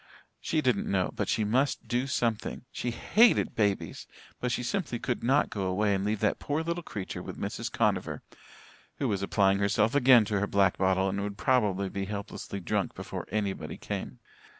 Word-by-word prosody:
She - - 0
didn't - - +1
know, - - +1
but - - -2
she 110 - +1
must 125 +4 0
do 125 +3 0
something. 115 -2 -1
She 125 - -3
hated 220 - +3
babies 100 -3 -1 0.3
but 125 - -1
she 125 - -1
simply 140 -2 -2
could 120 +1 -3
not 135 +5 +3
go 100 -2 -2
away 100 +2 +1
and 95 0 0
leave 105 0 -1
that 105 - +1
poor 150 +2 -1
little 170 +1 -2
creature 100 - -6
with - - -8
Mrs. - - -4
Conover - - 0 0.7
who - - -1
was 100 -2 -1
applying 100 0 +2
herself 105 +2 +2
again 130 -5 +6
to 105 -1 0
her 100 - 0
black 100 -2 +2
bottle 95 0 +2
and 100 +1 -1
would 100 0 -4
probably 105 -5 +2
be 100 +1 -3
helplessly 100 0 -5
drunk 85 - -1
before - - -6
anybody 100 -2 -3
came. 65 -2 -5
105 Hz, 185 wpm, -29 LUFS, 100-125 Hz, 0.7 s, again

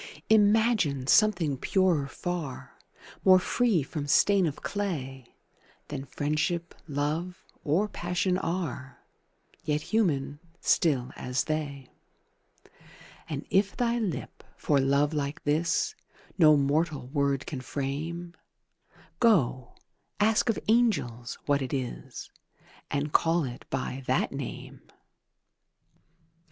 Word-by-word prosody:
Imagine 210 - +3
something 175 -5 +3
purer 180 -7 +2
far, 165 -2 -5 0.4
More 185 -1 +8
free 200 - +1
from 145 +1 -5
stain 195 +4 +4
of 145 - -6
clay 135 -11 -4 0.5
Than 135 - -5
Friendship, 150 +5 -2
Love, 155 +5 -3 0.2
or 175 +9 +2
Passion 180 -1 -1
are, 160 -8 -4 0.7
Yet 150 0 0
human, 145 -10 +1 0.2
still 135 -7 +2
as 125 0 -1
they: 145 -4 -4 1.4
And 150 -1 -4
if 195 +1 +2
thy 240 -1 +1
lip, 200 -8 -4
for 145 -2 +2
love 140 +3 +2
like 145 -1 -3
this, 155 +3 +1 0.4
No 155 -4 +6
mortal 145 0 0
word 140 -1 0
can 135 -4 -5
frame, 155 +7 -4 0.9
Go, 135 - +2 0.4
ask 220 +2 +3
of 225 - +2
angels 195 - +1
what 145 -1 +2
it 130 +1 -2
is, 130 -3 -6 0.6
And 145 +1 -2
call 165 0 +3
it 125 -2 -7
by 130 0 -3
that 130 - +1
name! 135 -2 -7
150 Hz, 105 wpm, -28 LUFS, 140-185 Hz, 1.4 s, More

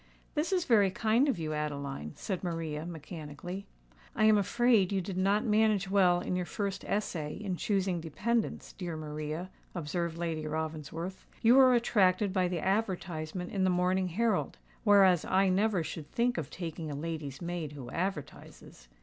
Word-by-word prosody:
"This 315 +4 -1
is 365 -3 +1
very 210 -5 +5
kind 225 +8 +2
of 265 - +1
you, 155 -2 -3
Adeline," 140 - -4
said 190 -3 -4
Maria, 165 -2 -3
mechanically. 165 +3 -7 0.5
"I - - +1
am 215 0 +7
afraid 210 -1 +3
you 195 - +1
did 185 +1 -4
not 200 +5 +2
manage 210 -3 +2
well 180 -3 +4
in 185 - -2
your 180 -1 -2
first 200 -2 -3
essay 160 -7 -2
in 195 -3 -3
choosing 190 -2 0
dependants, 220 +9 -2
dear 175 -4 -5
Maria," 155 +3 -5 0.2
observed 170 0 -2
Lady 165 -2 -2
Ravensworth. 160 +3 -4 0.2
"You 230 +1 +7
were 260 -1 +7
attracted 200 -4 +3
by 185 -2 +2
the 175 -2 -2
advertisement 180 -4 -2
in 195 -2 0
the 185 - +3
Morning 180 +1 +2
Herald; 210 +3 0 0.3
whereas 195 -5 +6
I 190 +1 +3
never 195 -1 +2
should 155 -1 -7
think 240 -4 +1
of 150 - -5
taking 165 -3 -5
a 145 - -4
lady's 150 -3 -5
maid 170 -4 -4
who 130 -4 -8
advertises. 165 - -5
180 Hz, 165 wpm, -31 LUFS, 160-200 Hz, 0.5 s, am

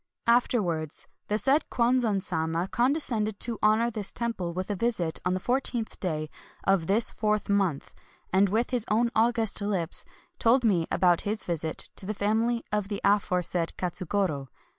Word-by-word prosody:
Afterwards, 190 - +1 0.2
the 210 - +1
said 275 +6 +3
Kwanzan 235 -5 +1
Sama 165 +1 -1
conde 245 +7 +2
scended 220 -9 -1
to 230 0 -3
honor 220 +3 +3
this 210 -3 -2
temple 230 -8 -3
with 185 +4 -4
a - - -1
visit 185 -6 0
on 180 +1 0
the - - -1
fourteenth 245 0 -2
day 155 -4 -2 0.4
of 195 -4 +2
this 215 +4 +3
fourth 215 -1 0
month, 195 -8 0 0.4
and 195 +1 +4
with 225 +5 0
his 240 -3 +1
own 235 +2 +2
august 225 -2 +2
lips 190 -5 -1 0.4
told 245 +3 +4
me 180 -8 +2
about 175 -2 +3
his 215 +1 -3
visit 160 -2 -3
to 190 - +2
the 215 - -2
fam 210 +3 +1
ily 235 -1 -2
of 210 -2 0
the 205 -1 -3
aforesaid 180 -4 +1
Katsugoro. 180 -5 -1
205 Hz, 165 wpm, -27 LUFS, 180-230 Hz, 0.4 s, and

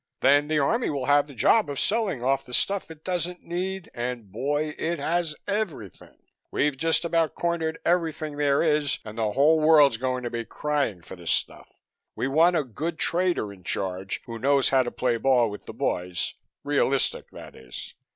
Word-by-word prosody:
Then 145 +2 +5
the 155 0 +1
Army 225 - +1
will 140 -3 -2
have 145 +1 +4
the 140 - -12
job 195 - +3
of 140 - -3
selling 205 - 0
off 135 +1 +1
the 125 - -4
stuff 200 -3 0
it 160 -1 -12
doesn't 180 -1 -3
need 185 +2 -4
and 120 -4 -4
boy! 145 +5 -1
it 170 +1 -1
has 160 +1 -1
everything. 200 - -4 0.3
We've 145 -1 +1
just 165 +4 +1
about 165 -1 +1
cornered 165 -2 -1
everything 160 -3 0
there 145 0 +2
is 150 -3 +1
and 110 0 -8
the 110 -2 0
whole 155 +5 +4
world's 150 -6 +6
going 130 +1 -2
to 120 - -3
be 115 0 -3
crying 140 - -2
for - - -9
the 85 -2 -13
stuff. - - -2 0.4
We 130 - -1
want 165 +6 +4
a 155 - +2
good 160 +7 -4
trader 170 - 0
in 95 -2 -17
charge, 95 +1 -3
who 115 -1 -7
knows 140 +2 +3
how 135 -1 +4
to 120 - -2
play 125 -2 0
ball 120 -2 +3
with 105 - -10
the - - -7
boys, 90 -1 -2 0.3
realistic 140 -1 0
that - - -12
is. 65 -2 -9
145 Hz, 190 wpm, -26 LUFS, 125-165 Hz, 0.4 s, world's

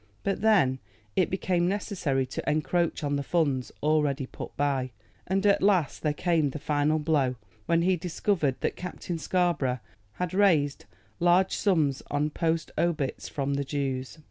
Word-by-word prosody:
But 195 -1 -1
then 185 -13 +4 0.4
it 185 - +2
became 180 -2 0
necessary 180 -9 -1
to 130 - -4
encroach 160 +2 0
on 145 0 0
the - - -1
funds 140 -5 0
already 150 -3 +2
put - - -9
by, 140 -3 0 0.4
and 195 +2 0
at 200 0 +4
last 190 -7 +2
there 150 - +1
came 165 -3 +1
the 135 - -6
final 150 +1 +1
blow, 150 -5 +1 0.3
when 170 0 +3
he 185 0 +3
discovered 165 -4 0
that - - -1
Captain 180 -1 -5
Scarborough 165 -8 +1 0.4
had 180 +5 -3
raised 165 -8 +3 0.3
large 175 +2 +3
sums 155 -9 +1
on 150 +1 0
post 165 0 -1
obits 155 -6 -1
from 140 -1 -2
the 140 0 0
Jews. 135 -1 -3
155 Hz, 155 wpm, -27 LUFS, 140-180 Hz, 0.4 s, then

